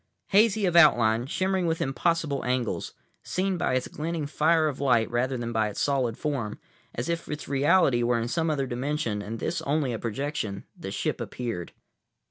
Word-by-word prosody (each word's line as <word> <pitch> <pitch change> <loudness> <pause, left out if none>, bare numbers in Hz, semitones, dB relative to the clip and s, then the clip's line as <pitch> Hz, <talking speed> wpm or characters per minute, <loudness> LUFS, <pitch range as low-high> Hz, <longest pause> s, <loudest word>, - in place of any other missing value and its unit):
Hazy 210 0 +4
of 175 -2 0
outline, 120 -7 +5
shimmering 185 +3 0
with 165 0 0
impossible 150 0 0
angles, 125 -2 -2 0.3
seen 190 +1 -1
by 155 - 0
its 130 - 0
glinting 160 0 -3
fire 155 +2 +2
of 145 -3 -3
light 120 -5 +3
rather 130 +2 0
than 120 -1 -4
by 110 -1 +1
its 105 - -6
solid 130 -5 +1
form, 135 -8 -3 0.4
as 120 - -3
if 170 0 -3
its 150 0 -5
reality 140 -2 +3
were 120 0 +2
in 115 - -2
some 165 +5 0
other 140 -3 0
dimension 125 -3 -2
and 110 +3 -5
this 170 +9 -2
only 140 -3 0
a 110 - -4
projection, 115 -4 -3
the - - -7
ship - - -2
appeared. 115 -9 -4
140 Hz, 180 wpm, -27 LUFS, 120-165 Hz, 0.4 s, outline